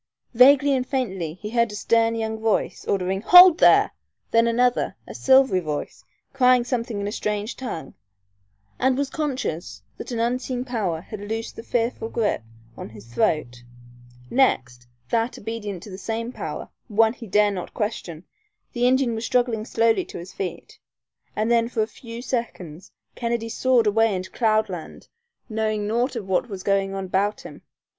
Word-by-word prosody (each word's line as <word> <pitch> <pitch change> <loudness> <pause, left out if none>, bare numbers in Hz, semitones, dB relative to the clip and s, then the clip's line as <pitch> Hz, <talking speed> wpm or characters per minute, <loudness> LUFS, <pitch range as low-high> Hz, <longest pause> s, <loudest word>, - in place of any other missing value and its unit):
Vaguely, 275 +2 +6
faintly 195 - -3
he 210 +3 -8
heard 235 -2 +2
a - - -7
stern 230 +2 +2
young 220 -1 -3
voice 220 -1 -1
ordering 190 0 -1
"Hold 360 - +9
there!" - - +6 0.4
then 230 0 +4
another, 245 +1 +1
a - - -8
silvery 265 -7 +4
voice, 155 -4 -5 0.3
crying 255 -2 +4
something 235 -3 -3
in 200 - -3
a - - -3
strange 210 +1 -3
tongue, 170 - -6 0.9
and 260 0 +2
was 280 -1 -1
conscious 175 - -4 0.2
that - - -7
an 235 - -2
unseen 250 +1 -1
power 200 -10 -2
had 210 +3 -9
loosed 225 +2 -5
the - - -7
fearful 230 -1 -2
grip 225 -3 0 0.3
on - - -8
his 110 +1 -14
throat; 120 -2 0 0.7
next, 125 - +1 0.2
that, 230 +1 0
obedient 205 -4 -6
to 205 - -10
that 185 - -8
same 230 +3 -3
power, - - -6 0.2
one 220 0 +3
he 235 -2 -10
dare 205 +2 +3
not 185 -3 -6
question, 190 -6 -4 0.5
the 245 0 +2
Indian 260 -1 +2
was 225 0 -4
struggling 235 -2 0
slowly 230 +9 +2
to 370 - -10
his 175 +2 -9
feet, 195 - -6 0.6
and 220 +2 0
then 230 0 +3
for 225 -3 0
a - - -4
few 230 0 -10
seconds 195 - -5 0.2
Kennedy 235 -1 -2
soared 245 0 +2
away 220 0 +3
into 185 0 -5
cloudland, 215 -7 -1 0.4
knowing 215 -2 -1
naught 240 +5 0
of 215 -5 -5
what 190 +6 0
was 190 -3 -7
going 195 -1 0
on 195 -1 -4
about 200 +3 0
him. - - -11
225 Hz, 165 wpm, -23 LUFS, 195-245 Hz, 0.9 s, Hold